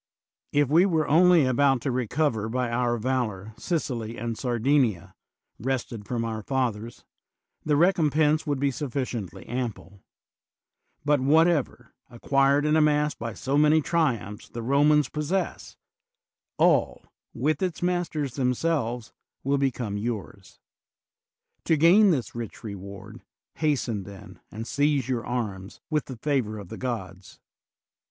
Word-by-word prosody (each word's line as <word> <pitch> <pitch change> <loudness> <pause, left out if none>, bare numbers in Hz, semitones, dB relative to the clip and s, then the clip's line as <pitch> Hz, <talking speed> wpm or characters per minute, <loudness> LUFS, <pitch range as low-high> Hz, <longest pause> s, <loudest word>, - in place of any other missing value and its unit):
If 145 -1 +3
we 165 +7 +4
were 160 -4 +1
only 170 0 +5
about 135 +1 +3
to 135 - -1
recover 125 -2 -1
by 125 0 -1
our 120 0 0
valor 110 -4 -2
Sicily 120 -5 -3
and 115 0 -3
Sardin 130 +4 +2
ia, 105 -9 -3 0.5
wrested 120 -4 -3
from 115 -2 -2
our 110 -1 -4
fathers, 120 -3 -3 0.6
the 150 -1 +1
recompense 155 -2 +2
would 145 -2 0
be 140 0 +1
suflSciently 125 - -4
ample; 115 -5 -5 1.0
but 145 -1 +3
whatever, 150 -3 +2 0.2
ac 120 - -13
quired 140 +1 +3
and 150 +1 +3
amassed 150 -1 +2
by 115 -1 -5
so 140 +2 0
many 150 +1 +5
triumphs, 135 - -1
the 115 - -6
Romans 145 +3 +3
possess, 155 +6 -3 0.8
all, - - +2 0.3
with 155 -1 0
its 180 -2 -2
masters 170 -6 -1
themselves, 125 -3 -1 0.3
will 140 +1 +1
become 120 -6 -1
yours. 105 -3 -6 1.1
To 160 - +3
gain 185 +7 +6
this 130 - -1
rich 115 -3 -7
reward, 100 +1 -9 0.4
hasten, 135 -9 0
then, 100 0 -12
and 110 +2 -7
seize 145 -1 +1
your 125 -3 -1
arms, 105 -6 -4
with 150 -1 0
the 130 - -8
favor 125 -6 -1
of 100 -4 -9
the - - -7
gods. 95 -7 -6
130 Hz, 130 wpm, -26 LUFS, 115-150 Hz, 1.1 s, gain